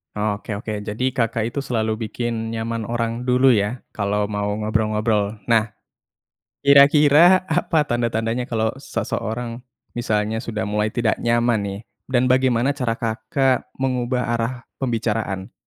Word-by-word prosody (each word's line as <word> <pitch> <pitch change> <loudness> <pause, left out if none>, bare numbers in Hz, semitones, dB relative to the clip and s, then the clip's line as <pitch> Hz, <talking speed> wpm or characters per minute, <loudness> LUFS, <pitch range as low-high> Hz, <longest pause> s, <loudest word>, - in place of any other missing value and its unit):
Oh, 105 -1 -1
oke 110 - -8
oke. 110 - -4
Jadi 125 +5 -1
Kakak 115 -2 -1
itu 140 - -3
selalu 110 -4 -2
bikin 115 0 -3
nyaman 115 -1 -3
orang 115 +1 -2
dulu, 130 +1 +5
ya, 110 +2 0
kalau 105 0 -1
mau 105 -1 -2
ngobrol-ngobrol. 110 -1 0
Nah, 110 -1 +2 0.9
kira-kira 145 +6 +6
apa 160 -3 +1
tanda-tandanya 120 0 -1
kalau 110 -1 0
seseorang 120 -3 -4 0.3
misalnya 110 -1 -1
sudah 110 -3 -3
mulai 105 +1 0
tidak 115 -2 0
nyaman, 120 -1 +2
nih, 100 0 -4 0.3
dan 125 -1 +2
bagaimana 130 0 +2
cara 125 -5 -1
Kakak 120 +4 0
mengubah 125 -1 0
arah 115 +2 -1 0.3
pembicaraan? 110 -6 -2
115 Hz, 130 wpm, -21 LUFS, 110-125 Hz, 0.9 s, kira-kira